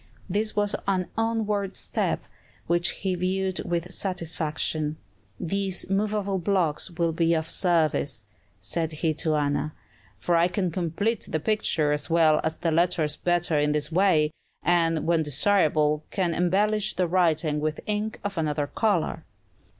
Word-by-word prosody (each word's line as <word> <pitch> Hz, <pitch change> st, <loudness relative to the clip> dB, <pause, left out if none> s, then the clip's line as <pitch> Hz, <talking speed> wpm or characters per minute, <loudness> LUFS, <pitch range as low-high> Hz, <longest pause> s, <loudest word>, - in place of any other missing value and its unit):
This 215 Hz, +1 st, -1 dB
was 205 Hz, -1 st, +1 dB
an 185 Hz, -2 st, +1 dB
onward 215 Hz, -3 st, -1 dB
step, -, -, -1 dB, 0.4 s
which 175 Hz, 0 st, +1 dB
he 190 Hz, +3 st, -2 dB
viewed 185 Hz, +1 st, -1 dB
with 175 Hz, +1 st, -3 dB
satisfaction. 160 Hz, -4 st, -2 dB, 0.4 s
"These 190 Hz, +1 st, -1 dB
movable 200 Hz, -1 st, 0 dB
blocks 175 Hz, -3 st, 0 dB
will 170 Hz, -1 st, 0 dB
be 165 Hz, +1 st, +2 dB
of 160 Hz, -1 st, -1 dB
service," 155 Hz, -, +1 dB, 0.3 s
said 160 Hz, -, -3 dB
he 155 Hz, +1 st, 0 dB
to 155 Hz, 0 st, 0 dB
Anna; 145 Hz, +1 st, -1 dB, 0.4 s
"for 170 Hz, -, 0 dB
I 170 Hz, +1 st, +4 dB
can 185 Hz, -1 st, -1 dB
complete 190 Hz, +6 st, -1 dB
the 155 Hz, -, -1 dB
picture 160 Hz, -5 st, +1 dB
as 150 Hz, +2 st, -1 dB
well 165 Hz, -2 st, +4 dB
as 160 Hz, 0 st, -1 dB
the 165 Hz, -, -1 dB
letters 160 Hz, -2 st, +1 dB
better 175 Hz, -2 st, +1 dB
in 150 Hz, 0 st, +2 dB
this 150 Hz, +2 st, -2 dB
way, 165 Hz, -4 st, +3 dB, 0.3 s
and, 165 Hz, -2 st, +2 dB
when 165 Hz, -1 st, +3 dB
desirable, 150 Hz, -1 st, +2 dB
can 180 Hz, -4 st, 0 dB
embellish 205 Hz, +5 st, +1 dB
the 180 Hz, -, +1 dB
writing 165 Hz, -4 st, +2 dB
with 155 Hz, 0 st, -2 dB
ink 210 Hz, +1 st, -2 dB
of 200 Hz, -4 st, -3 dB
another 150 Hz, -2 st, 0 dB
color." 170 Hz, -3 st, 0 dB
170 Hz, 145 wpm, -26 LUFS, 155-195 Hz, 0.4 s, I